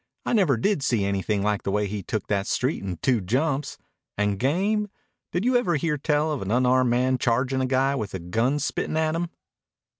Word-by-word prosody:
I - - 0
never 180 - +3
did 175 - +1
see 120 -7 +1
anything 100 +1 -1
like 105 -1 0
the - - -3
way 105 +1 +1
he 100 0 -4
took 105 +3 -3
that 100 -1 -1
street 130 +5 0
in 95 -3 -4
two 125 -5 +2
jumps. 135 - -1 0.4
And 105 -1 0
game? 200 - +1 0.4
Did 180 +5 -1
you 250 0 +3
ever 225 -9 +2
hear 150 0 -1
tell 150 +1 +1
of 145 - -3
an 95 - -4
unarmed 125 +2 +3
man 125 +2 +2
chargin' 130 +3 +1
a 130 - 0
guy 135 +1 +2
with 105 -7 -4
a - - -3
gun 115 +11 0
spittin' 150 +2 -2
at 160 0 +1
him?" 170 +1 -2
130 Hz, 210 wpm, -25 LUFS, 105-150 Hz, 0.4 s, never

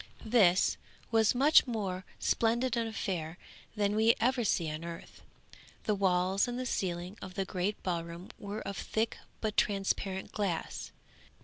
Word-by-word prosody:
This 205 -6 +4 0.3
was 225 0 +4
a - - -1
much 285 +2 +6
more 195 -6 -3
splendid 235 +2 +1
affair 190 -8 -2 0.4
than 205 -1 +1
we 220 +2 +5
ever 250 +1 +2
see 175 -5 +1
on 155 +2 -5
earth. 170 0 -8 0.6
The 215 - +1
walls 190 0 +2
and 245 0 -3
the 255 - -3
ceiling 180 -2 -2
of 185 - -8
the 195 - -1
great 190 +3 -2
ballroom 170 0 -4
were 205 +1 -5
of 200 -1 -5
thick 220 +4 -1 0.2
but 215 -1 -2
transparent 195 -1 0
glass. 195 -6 -3
200 Hz, 145 wpm, -31 LUFS, 180-225 Hz, 0.6 s, much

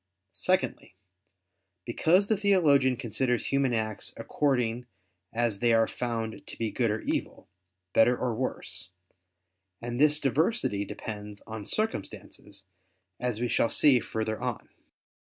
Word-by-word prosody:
Secondly, - - 0 0.9
because 170 - +3
the 220 - +2
theologian 155 - +3
considers 120 0 -1
human 140 -2 +1
acts 110 -2 -2
according 125 -4 0 0.4
as 115 -3 0
they 120 +1 +3
are 115 0 +4
found 115 -2 -4
to - - -8
be 115 -2 -2
good 120 -3 +1
or 110 +1 -1
evil, - - -3 0.5
better 120 +2 +5
or 125 -2 -1
worse: 110 -3 -4 0.9
and 120 +2 -4
this 150 0 +6
diversity 140 - +1
depends 105 0 -7
on 110 -2 -7
circumstances, 100 - -3 0.6
as 125 -3 -2
we 120 - 0
shall 115 - +2
see 140 -5 +5
further 110 -1 -3
on - - -4
(Q. - - -37
120 Hz, 130 wpm, -28 LUFS, 110-140 Hz, 0.9 s, this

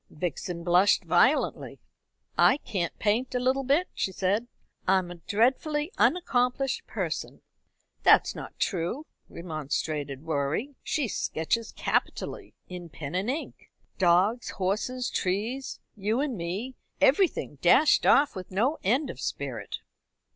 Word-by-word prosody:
Vixen 170 +1 -4
blushed 180 +3 +4
violently. 180 - +2 0.6
"I 275 - +5
can't 185 - -3
paint 235 +5 0
a - - +2
little 260 +2 +1
bit," 290 +8 +2
she 190 - -1
said. 200 +5 0 0.4
"I 190 +1 +5
am 180 -2 -2
a 175 - -8
dreadfully 295 - +1
unaccomplished 270 -5 +1
person." - - -4 0.6
"That's - - +5
not - - -9
true," 195 - -2 0.2
remonstrated 150 -3 -4
Rorie. 160 - -1
"She 290 -5 -1
sketches 215 +4 -2
capitally - - -2
in 180 -2 -8
pen 145 0 -7
and 190 +5 -1
ink 290 +5 -5 0.3
dogs, 190 +6 +3
horses, 215 +6 -2
trees, 220 +9 -2 0.2
you 215 +3 -1
and 280 -3 -1
me, 195 +8 -4 0.3
everything, 340 +7 +2
dashed 305 - +5
off 290 -2 +5
with 185 -1 -7
no 235 +11 0
end 255 +8 +1
of 125 - -11
spirit." 125 -7 -4
205 Hz, 125 wpm, -27 LUFS, 175-260 Hz, 0.6 s, I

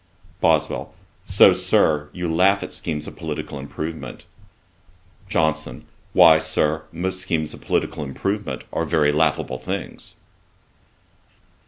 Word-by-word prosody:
BOSWELL. - - +1 0.3
'So, - - +6
Sir, 75 -1 +2
you 90 -1 -4
laugh 95 +5 +3
at - - -6
schemes 75 -2 -3
of - - -9
political 70 - -5
improvement.' 80 +3 -6 1.0
JOHNSON. 80 0 -1 0.3
'Why, 80 -1 +7
Sir, 80 0 -1
most 95 +3 -3
schemes 80 -4 -2
of - - -12
political 75 - -1
improvement 95 +9 -3
are 80 - 0
very 75 -2 +2
laughable 75 -4 0
things.' 65 - -6
80 Hz, 115 wpm, -22 LUFS, 75-85 Hz, 1.0 s, Why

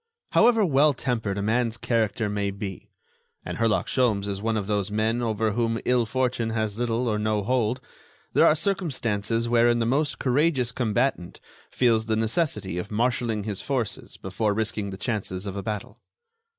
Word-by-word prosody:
However 225 -2 +5
well 145 -2 +4
tempered 115 -6 -2
a 100 - -2
man's 115 +2 +1
character 110 -2 0
may 100 -1 -1
be—and 100 +2 -9
Herlock 115 -2 +2
Sholmes 110 -6 +1
is 100 -1 -3
one 110 0 0
of 105 - -2
those 105 -1 -1
men 110 +3 0
over 110 -2 0
whom 115 +1 0
ill 125 -2 +2
fortune 125 -2 0
has 110 -1 -2
little 120 0 0
or 105 -2 0
no 105 -1 0
hold—there 125 +1 -1
are 155 - +5
circumstances 120 - -1
wherein 120 0 +4
the 115 - 0
most 145 +5 +1
courageous 130 -1 +1
combatant 120 -5 -1 0.3
feels 115 -3 +2
the 110 - +1
necessity 110 - 0
of 90 - -5
marshaling 115 -1 0
his 100 -2 -3
forces 130 -7 -3
before 100 +2 -1
risking 105 -2 -2
the 95 - -7
chances 105 -4 -3
of 100 -1 -5
a 100 - -3
battle. 105 +4 -5
115 Hz, 165 wpm, -25 LUFS, 105-125 Hz, 0.3 s, However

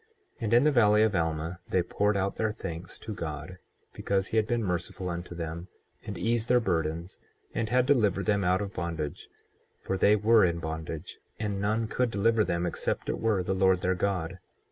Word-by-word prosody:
24:21 445 - -37 0.3
Yea, 115 - -3
and 110 - 0
in 120 - +6
the 150 - +4
valley 105 -4 +5
of 110 -2 +2
Alma 80 +1 -1
they 90 - +2
poured 105 +3 +1
out 100 0 -1
their 110 -1 0
thanks 85 -4 -7
to 110 - -6
God 80 0 -6 0.3
because 95 -1 -1
he 115 - -1
had 110 -1 +3
been 120 -1 0
merciful 90 0 -2
unto 85 0 -5
them, 85 +1 -5 0.4
and - - -4
eased 115 0 0
their 125 0 +5
burdens, 85 -3 -2 0.3
and 115 -1 -1
had 125 0 +3
delivered 105 -8 +2
them 100 0 +2
out 90 +2 +2
of 100 - -6
bondage; 80 -3 -4 0.5
for 95 - -3
they 105 +2 +5
were 110 +1 +5
in 85 -2 +2
bondage, 80 +1 -6 0.2
and 100 -2 -2
none 110 +2 0
could 125 +2 0
deliver 110 +1 +2
them 85 -3 -1
except 85 - -2
it - - -1
were 105 -5 +1
the 95 - -1
Lord 95 -1 +3
their 90 - +2
God. 90 -2 -2
95 Hz, 205 wpm, -28 LUFS, 85-110 Hz, 0.5 s, in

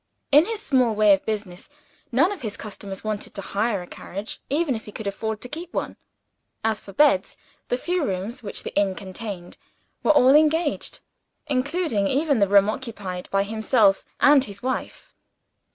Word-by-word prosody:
In 295 +4 +6
his 450 -2 -3
small 255 - +2
way 210 -1 +6
of 195 - -1
business, 205 -3 -4 0.4
none 280 +10 +3
of 405 - -6
his 215 -4 -4
customers 200 -2 -7
wanted 215 -1 -4
to 200 - -4
hire 205 -2 -1
a - - -12
carriage 200 +4 -7
even 295 0 +1
if 220 - -6
he 210 - -9
could 220 - -7
have 200 - -1
afforded 220 0 -4
to 250 - -7
keep 335 +4 -7
one. - - -2 0.7
As 220 -1 +1
for 195 - -12
beds, 235 -6 +3 0.3
the 245 - 0
few 355 +5 -1
rooms 200 +1 -3
which 205 - -5
the - - -6
inn 200 -2 +2
contained 190 -2 -7 0.4
were - - -1
all 270 -3 +6
engaged; 310 +1 +2 0.4
including 280 - 0
even 280 0 +2
the 200 - +4
room 200 0 +5
occupied 210 -6 -5
by 195 0 +2
himself 215 -1 +2 0.2
and 285 -2 +6
his 200 0 -10
wife. 260 0 -4
220 Hz, 180 wpm, -24 LUFS, 200-280 Hz, 0.7 s, In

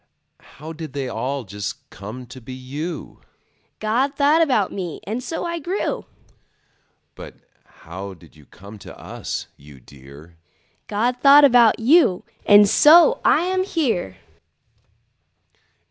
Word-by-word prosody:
How 155 +3 -9
did 160 -4 -9
they 140 -2 -4
all 130 +4 -4
just 100 -1 -7
come 105 +7 -9
to 130 +1 -13
be 130 +3 -9
you? 145 +7 -7 0.6
God 245 +6 -1
thought 295 +3 +3
about 255 - +1
me, 180 -5 -6
and 220 +6 -5
so 325 +6 -5
I 340 0 -4
grew. 355 +6 -3 1.1
But - - -12 0.5
how 95 +3 -8
did 85 -2 -20
you 75 -2 -20
come 100 +2 -14
to - - -13
us, - - -6
you 70 -1 -16
dear? 70 +6 -16 0.5
God 235 +4 -1
thought 285 +1 +7
about 240 -4 +5
you, 240 - +3 0.2
and 205 0 +7
so 340 - +5
I - - +3
am 370 +1 -1
here. 235 - -2
175 Hz, 130 wpm, -21 LUFS, -, 1.1 s, thought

